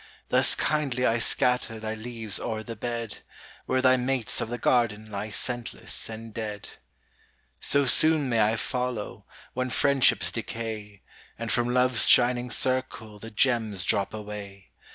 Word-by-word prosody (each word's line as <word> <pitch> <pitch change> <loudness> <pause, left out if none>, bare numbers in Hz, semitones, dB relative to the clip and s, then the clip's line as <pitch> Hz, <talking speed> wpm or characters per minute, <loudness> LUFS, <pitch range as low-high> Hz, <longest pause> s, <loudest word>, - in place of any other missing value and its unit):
Thus - - +3
kindly 135 -5 0
I 115 0 +2
scatter 125 -1 +1
Thy 110 0 -4
leaves 110 -3 -3
oŌĆÖer 110 -1 -4
the 115 - -6
bed, 115 0 -4 0.5
Where 130 0 +1
thy 130 0 +5
mates 125 -2 -1
of - - -3
the 120 - -3
garden 115 -4 +1
Lie 100 +2 -4
scentless 120 +1 -4
and 110 0 -8
dead. 105 -2 -5 0.9
So 140 0 +3
soon 155 +2 +5
may 115 -3 +2
I 105 +1 +3
follow, 125 -2 -4 0.3
When 130 0 -2
friendships 140 +1 +3
decay, 110 -3 -6 0.3
And 115 0 -4
from 120 -1 +1
LoveŌĆÖs 125 -1 +3
shining 125 0 +4
circle 120 -4 -1
The 115 - -9
gems 110 -4 0
drop 100 +1 +1
away. 105 -3 -9
115 Hz, 145 wpm, -26 LUFS, 110-125 Hz, 0.9 s, thy